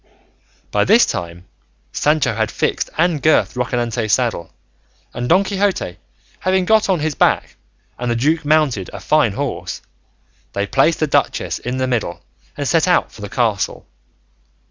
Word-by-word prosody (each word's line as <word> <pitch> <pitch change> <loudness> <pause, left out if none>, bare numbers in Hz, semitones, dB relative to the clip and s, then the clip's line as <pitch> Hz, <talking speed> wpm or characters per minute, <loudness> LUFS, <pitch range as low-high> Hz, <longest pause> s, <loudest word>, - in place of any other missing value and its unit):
By - - +2
this - - +5
time 85 +1 -5 0.5
Sancho 150 -4 +1
had 110 0 -1
fixed - - -1
and 165 -3 +2
girthed 155 +2 +3
Rocinante's 120 -2 -1
saddle, 120 -9 0 0.6
and 120 +1 -4
Don 185 +4 +5
Quixote 195 - -1 0.4
having 185 0 +1
got 220 0 +3
on 180 -5 +1
his 155 0 -1
back - - +1 0.4
and 125 0 -2
the 120 - +1
duke 150 +6 +1
mounted 145 - +1
a - - -6
fine 150 -9 +2
horse, 90 -10 -4 0.7
they 100 - -1
placed 140 +10 +2
the - - +4
duchess 145 - 0
in 125 +1 -4
the 130 - 0
middle 110 -9 -2 0.3
and 145 -1 -2
set 165 +3 +2
out 180 - +2
for - - -13
the 105 - -6
castle. 110 -5 -1
130 Hz, 155 wpm, -19 LUFS, 110-155 Hz, 0.7 s, this